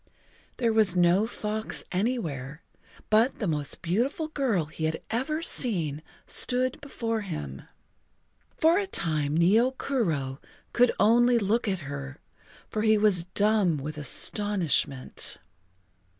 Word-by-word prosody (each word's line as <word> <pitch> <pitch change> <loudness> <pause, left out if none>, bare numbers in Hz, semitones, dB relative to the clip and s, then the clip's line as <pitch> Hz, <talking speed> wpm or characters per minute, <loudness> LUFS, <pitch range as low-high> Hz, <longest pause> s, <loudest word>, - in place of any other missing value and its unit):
There 230 -3 +1
was 215 -5 +3
no 180 +4 +3
fox 215 -1 -4
anywhere, 165 - -3 0.5
but 225 +5 +3
the 215 - -3
most 150 -5 -2
beautiful 245 - -1
girl 250 - 0
he 155 +1 -5
had 160 0 -2
ever 305 +8 -2
seen 165 - 0 0.2
stood 255 +1 +3
before 230 -5 -3
him. 75 - -6 1.0
For 330 +4 +4
a 400 - -3
time 155 - 0
Nio 225 +10 +3
Kuro 155 - -2 0.3
could 245 0 +4
only 240 +3 +4
look 225 +2 0
at 190 -3 -2
her, 140 0 -7 0.5
for 215 - -3
he 215 0 +3
was 205 -5 +2
dumb 205 -3 +1
with 150 +2 -6
astonishment. 155 -3 +1
205 Hz, 120 wpm, -27 LUFS, 155-235 Hz, 1.0 s, For